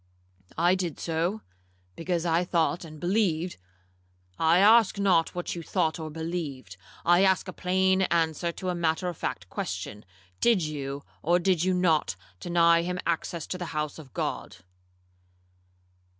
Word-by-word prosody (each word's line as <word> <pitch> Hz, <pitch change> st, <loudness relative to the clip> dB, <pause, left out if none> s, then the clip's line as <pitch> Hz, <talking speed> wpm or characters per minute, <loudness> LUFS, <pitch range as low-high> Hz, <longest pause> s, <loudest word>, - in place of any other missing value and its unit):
'—'I 175 Hz, +2 st, +4 dB
did 180 Hz, -4 st, -2 dB
so, 170 Hz, +6 st, -1 dB, 0.5 s
because 170 Hz, -, -2 dB
I 170 Hz, +1 st, +2 dB
thought 175 Hz, 0 st, 0 dB
and 155 Hz, -2 st, -10 dB
believed—' 180 Hz, -2 st, 0 dB, 0.8 s
'I 165 Hz, +2 st, +4 dB
ask 215 Hz, +2 st, +6 dB
not 185 Hz, -5 st, +2 dB
what 175 Hz, -, -3 dB
you 170 Hz, -, -5 dB
thought 160 Hz, 0 st, -1 dB
or 160 Hz, -1 st, -5 dB
believed; 155 Hz, -, -5 dB, 0.3 s
I 175 Hz, +2 st, +5 dB
ask 190 Hz, 0 st, +2 dB
a 185 Hz, -, -6 dB
plain 190 Hz, +1 st, +2 dB
answer 165 Hz, 0 st, +1 dB
to 185 Hz, +2 st, -5 dB
a -, -, 0 dB
matter 170 Hz, +1 st, 0 dB
of 175 Hz, -, -7 dB
fact 90 Hz, +1 st, -4 dB
question. 105 Hz, +1 st, -5 dB, 0.4 s
Did 230 Hz, -7 st, +3 dB
you, 140 Hz, -2 st, -4 dB, 0.2 s
or 175 Hz, +3 st, +3 dB
did 180 Hz, -2 st, +1 dB
you 185 Hz, 0 st, +2 dB
not, 165 Hz, -, +2 dB, 0.2 s
deny 170 Hz, -1 st, +4 dB
him 180 Hz, +1 st, -3 dB
access 170 Hz, -1 st, -2 dB
to 185 Hz, -, -5 dB
the 175 Hz, -, -3 dB
house 150 Hz, +1 st, -3 dB
of 140 Hz, -5 st, -12 dB
God?' -, -, -4 dB
170 Hz, 150 wpm, -27 LUFS, 160-180 Hz, 0.8 s, ask